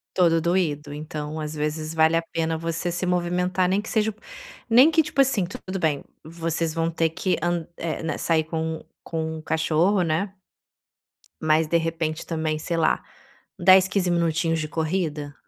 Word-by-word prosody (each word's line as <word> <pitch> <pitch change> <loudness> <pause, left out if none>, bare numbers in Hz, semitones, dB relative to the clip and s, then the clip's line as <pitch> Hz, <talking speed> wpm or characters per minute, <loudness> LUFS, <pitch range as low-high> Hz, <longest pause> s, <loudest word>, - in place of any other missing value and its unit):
Todo 165 -3 +4
doído, 155 -5 0
então 155 0 -5
às 155 0 -4
vezes 155 +1 -3
vale 160 0 +4
a - - +1
pena 160 0 0
você 165 +1 -2
se 180 +2 -2
movimentar 180 +1 +1
nem 195 +2 +2
que 215 - -11
seja, 220 -1 +1 0.6
nem 255 +7 +7
que 320 0 +3
tipo 285 -2 +1
assim 240 -9 +2
tudo 185 +2 -6
bem, 155 -4 0 0.2
vocês 165 0 -2
vão 165 0 0
ter 165 -1 0 0.3
an 175 -2 0
é, 165 -1 -3
né 155 -2 -2
sair 160 -2 +1
com 160 0 -3 0.2
com 160 -1 -4
cachorro, 160 +5 +2
né. 175 +5 -1 1.1
Mas 155 0 +3
de 170 - +3
repente 165 -1 -2
também 160 -2 -2
sei 170 +2 -3
lá, 165 - +2 0.6
10 190 0 +6
15 190 -3 0
minutinhos 165 -1 +1
de 155 - -2
corrida? 155 -3 -2
165 Hz, 165 wpm, -24 LUFS, 155-180 Hz, 1.1 s, nem